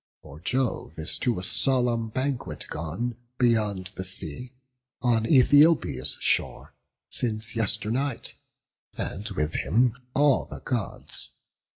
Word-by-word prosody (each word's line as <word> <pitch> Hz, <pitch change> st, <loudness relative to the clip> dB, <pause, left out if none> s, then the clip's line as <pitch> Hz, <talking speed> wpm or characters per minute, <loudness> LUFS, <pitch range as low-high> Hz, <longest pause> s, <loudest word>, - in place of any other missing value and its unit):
For 75 Hz, -, -12 dB
Jove 125 Hz, -4 st, -1 dB
is 80 Hz, +3 st, -2 dB
to 120 Hz, -5 st, 0 dB
a 90 Hz, -, -4 dB
solemn 120 Hz, 0 st, +2 dB
banquet 130 Hz, +2 st, -3 dB
gone 90 Hz, +10 st, -3 dB, 0.2 s
Beyond 105 Hz, -7 st, +1 dB
the 95 Hz, -, -5 dB
sea, 95 Hz, -, -5 dB, 0.5 s
on 115 Hz, -3 st, +2 dB
Æthiopia's 135 Hz, -, +4 dB
shore, -, -, 0 dB, 0.4 s
Since 110 Hz, -1 st, -1 dB
yesternight; 115 Hz, +4 st, 0 dB, 0.6 s
and 105 Hz, +3 st, -4 dB
with 80 Hz, -5 st, -2 dB
him 120 Hz, +1 st, +2 dB, 0.2 s
all 145 Hz, -1 st, +4 dB
the -, -, -8 dB
Gods. 120 Hz, -6 st, -4 dB
115 Hz, 110 wpm, -26 LUFS, 95-125 Hz, 0.6 s, Æthiopia's